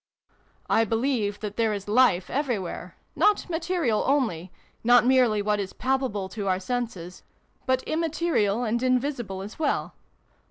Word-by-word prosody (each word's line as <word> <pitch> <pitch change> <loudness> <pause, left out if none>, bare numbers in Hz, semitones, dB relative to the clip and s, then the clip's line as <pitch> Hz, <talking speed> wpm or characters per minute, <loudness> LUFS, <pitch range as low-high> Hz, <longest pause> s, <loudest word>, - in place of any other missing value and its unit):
" - - -37 0.2
I 225 - +3
believe 225 -2 -1
that 210 -1 -5
there 225 -2 +2
is 200 -1 -5
life 210 -5 +3
everywhere 245 - -3 0.2
not 420 -1 +2
material 325 -9 0
only, 220 - 0 0.3
not 245 +1 +5
merely 245 -5 +3
what 210 0 +1
is 195 -1 -4
palpable 255 -7 -1
to 200 0 -5
our 185 -1 +1
senses 190 -5 -4 0.5
but 260 0 +1
immaterial 315 -9 0
and 235 +1 0
invisible 250 -6 -1
as 210 +8 -10
well. 305 -3 -1
235 Hz, 145 wpm, -26 LUFS, 205-265 Hz, 0.5 s, not